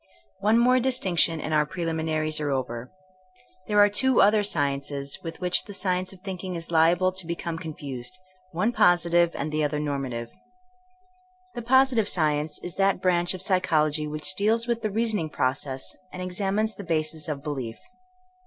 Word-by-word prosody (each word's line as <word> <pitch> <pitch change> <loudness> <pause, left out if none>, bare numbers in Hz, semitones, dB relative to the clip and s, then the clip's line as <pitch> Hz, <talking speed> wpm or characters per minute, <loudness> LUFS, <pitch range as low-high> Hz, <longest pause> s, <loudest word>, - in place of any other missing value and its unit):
One 215 +3 +3
more 250 +2 +4
distinction 185 -10 +1
and 155 - -3
our 150 -1 +4
preliminaries 160 -2 -2
are 150 -1 -2
over. 125 -3 -3 0.8
There 210 - 0
are 205 0 +8
two 255 +5 +3
other 210 +2 +5
sciences 140 -5 -1
with 165 -1 -7
which 180 -1 +2
the 205 - -7
science 185 -1 -1
of 190 -2 -14
thinking 185 -1 -5
is 170 0 -5
liable 170 +3 +4
to 185 -2 -5
be 170 - -2
come 165 -1 -5
confused; 145 -1 -5 0.3
one 185 +7 0
positive, 175 -4 +4 0.2
the 155 0 0
other 150 0 0
norma 140 -3 -2
tive. 115 -1 -6 1.2
The 240 - -5
positive 245 -3 +3
science 150 -2 0
is 175 - -6
that 195 -1 +2
brandi 180 -1 +2
of 185 - -8
psychol 185 -5 +2
ogy 150 0 -2
which 155 +4 -3
deals 225 +3 +1
with 235 -1 -1
the 215 - -1
reasoning 210 -6 0
process 130 -1 -2 0.2
and 185 - -8
examines 195 +4 -1
the 200 - -9
basis 160 -2 -1
of 145 -3 -4
belief. 130 -7 -4
170 Hz, 170 wpm, -25 LUFS, 150-200 Hz, 1.2 s, are